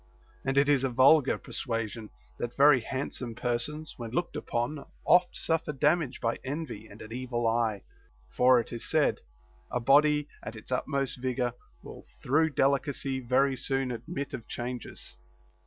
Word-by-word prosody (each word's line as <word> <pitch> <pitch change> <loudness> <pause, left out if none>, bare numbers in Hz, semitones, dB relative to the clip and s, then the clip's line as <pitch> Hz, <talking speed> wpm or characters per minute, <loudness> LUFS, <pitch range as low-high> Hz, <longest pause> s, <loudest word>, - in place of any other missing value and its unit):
And 135 +1 -1
it 140 +1 +5
is 140 -2 +3
a 135 - +1
vulgar 135 +3 +5
persuasion, 115 -2 -4 0.3
that 120 0 -4
very 140 -1 +7
handsome 125 -1 -4
persons, 130 +7 -3
when 115 -2 -6
looked 170 +9 -2
upon, 120 +5 -2 0.2
oft 180 0 +4
suffer 165 -2 0
dam 150 +5 +3
age 135 -5 -6
by 115 0 -1
envy 135 -6 -5
and 105 0 -12
an 110 - -9
evil 120 -1 -2
eye; 115 -3 +1 0.5
for 125 0 +5
(it 115 - -5
is 115 - -5
said) - - +2 0.5
a 125 - -1
body 150 +4 +4
at 110 - -7
its 110 - -10
utmost 135 0 -1
vigor 125 -1 -1 0.3
will - - -10 0.2
through 160 +5 +3
delicacy 140 -1 0
very 130 +2 +2
soon 135 0 -1
admit 140 +4 -5
of 115 - -6
changes. 125 0 -6
130 Hz, 155 wpm, -29 LUFS, 120-145 Hz, 0.5 s, very